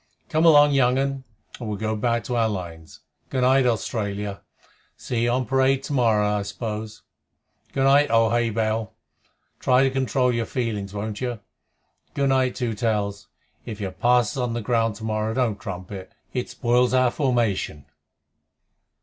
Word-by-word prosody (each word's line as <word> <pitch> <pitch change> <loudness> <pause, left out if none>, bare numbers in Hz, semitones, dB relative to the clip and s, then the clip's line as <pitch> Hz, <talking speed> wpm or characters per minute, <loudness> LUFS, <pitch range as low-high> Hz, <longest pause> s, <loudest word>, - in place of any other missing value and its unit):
Come 160 +2 +2
along, 145 -2 +7
young 130 -2 +3
un, 135 -1 -2 0.3
and 115 -3 -5
we'll 105 - -3
go 110 +1 -2
back 115 +2 0
to 125 - -3
our 115 -1 +2
lines. 85 -5 -7 0.3
Good 130 - -1
night, 130 0 +4
Australia! 105 -3 -2 0.6
See 120 -2 -3
you - - +2
on 125 +1 0
parade 135 +2 +2
to - - -4
morrow, 110 -5 +3
I 105 0 0
suppose. 105 +1 -6 0.7
Good 135 - 0
night, 140 +2 +5
old 115 -1 +3
Hay 120 0 +2
bale! 110 -1 -2 0.6
try 130 +1 +3
to 135 - +2
control 130 -1 +1
your 115 -1 -1
feelings, 110 -6 -3
won't 105 +1 -4
you? 120 -3 -3 0.8
Good 140 -1 +1
night, 130 -1 +2
Two 120 -3 -2
Tails! 105 -2 -2 0.4
If 110 -2 -7
you 95 -2 -3
pass 120 +4 +2
us - - -6
on 125 -2 -1
the 120 - -2
ground 115 -1 +1
tomorrow, 110 0 -2
don't 115 -5 0
trumpet. 95 0 -7 0.2
It 125 -1 -3
spoils 125 0 +2
our 130 -1 +3
formation." 120 - -1
115 Hz, 165 wpm, -24 LUFS, 105-130 Hz, 0.8 s, along